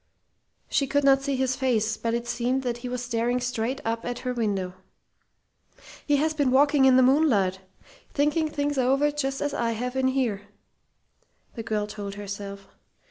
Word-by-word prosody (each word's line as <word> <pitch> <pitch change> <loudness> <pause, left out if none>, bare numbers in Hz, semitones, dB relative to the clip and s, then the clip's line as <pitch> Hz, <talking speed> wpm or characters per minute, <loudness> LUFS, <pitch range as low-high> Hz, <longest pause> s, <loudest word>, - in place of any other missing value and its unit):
She 275 - +1
could 285 +1 +1
not 270 0 +5
see 275 0 -1
his 260 0 0
face, 225 -5 +1
but 230 +1 -2
it 235 0 -3
seemed 250 +2 -1
that 240 -2 -2
he 245 +1 -6
was 250 0 -3
staring 240 +1 0
straight 250 +1 -2
up 230 0 -2
at 245 0 -3
her 250 - 0
window. 200 -6 -1 1.3
"He 290 - +4
has 310 +2 +1
been 290 -4 +1
walking 280 +1 +4
in 260 -1 +6
the 260 - +6
moonlight, 245 -9 +3 0.5
thinking 305 +2 +1
things 290 -2 -1
over 275 +4 +2
just 275 -2 -2
as 290 -1 -2
I 235 -4 0
have 250 +3 -4
in 265 0 +2
here!" 235 -7 -1 1.1
the 230 - -6
girl 215 -2 -1
told 205 -1 -7
herself. 200 -1 -7
250 Hz, 175 wpm, -26 LUFS, 225-275 Hz, 1.3 s, in